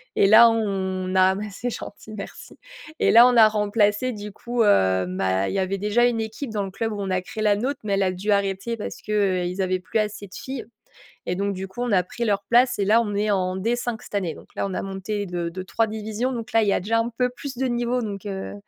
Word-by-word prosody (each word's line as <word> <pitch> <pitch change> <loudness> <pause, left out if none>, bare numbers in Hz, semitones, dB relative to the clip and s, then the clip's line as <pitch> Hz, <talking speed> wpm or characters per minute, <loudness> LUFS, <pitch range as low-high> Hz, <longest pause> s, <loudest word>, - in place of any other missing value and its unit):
Et - - +4
là, 230 +3 +8
on 190 -4 -1
a 190 0 +5 0.2
c'est 245 +5 -4
gentil, 215 -1 -8
merci 200 - -9 0.4
et - - +3
là, 235 +2 +9
on 250 - +2
a 220 - +9
remplacé, 210 +3 +1
du 210 -1 -7
coup 235 +3 -1
heu, 95 - +3
bah, 95 +1 0
il - - -4
y 195 - +1
avait 190 +1 -1
déjà 210 +4 +2
une 235 -2 +1
équipe 220 +4 -5
dans 210 -2 -1
le 195 - -6
club 225 +2 -3
où 205 - -4
on 195 - -3
a 185 0 +1
créé 220 +1 -6
la 210 -1 +4
nôtre, 265 +5 -2
mais 200 -2 -1
elle 195 - +2
a 185 - +1
dû 200 +4 -2
arrêter 200 +3 0
parce 210 - -5
qu'ils 190 -3 -1
avaient 185 0 0
plus 220 +4 -1
assez 210 -1 -3
de 190 - -18
filles. 265 -2 -6 0.6
Et 180 - -1
donc, 200 +1 -1
du 190 0 -5
coup, 190 +6 -8
on 245 - -1
a 185 -3 +3
pris 235 +6 -5
leur 200 -2 0
place. 245 -1 +4
Et 200 - +1
là, 220 +3 +5
on 210 -3 -3
est 210 +1 +1
en 185 -1 0
D5 235 +3 -1
cette - - -9
année. 185 -5 -1
Donc - - -14
là, - - -1
on 190 - -5
a - - -2
monté 195 +2 -4
de 175 -2 -3
de 185 +2 -6
3 225 +4 0
divisions, 220 +4 -3
donc 235 -1 -5
là, 225 - +5
il 205 - +1
y - - +3
a - - +1
déjà 225 +5 0
un 230 +1 0
peu 250 -1 +2
plus 255 +1 -8
de 265 - 0
niveau. 240 0 0
Donc, 205 -3 -5
heu, 195 -1 -5
205 Hz, 265 wpm, -23 LUFS, 190-230 Hz, 0.6 s, là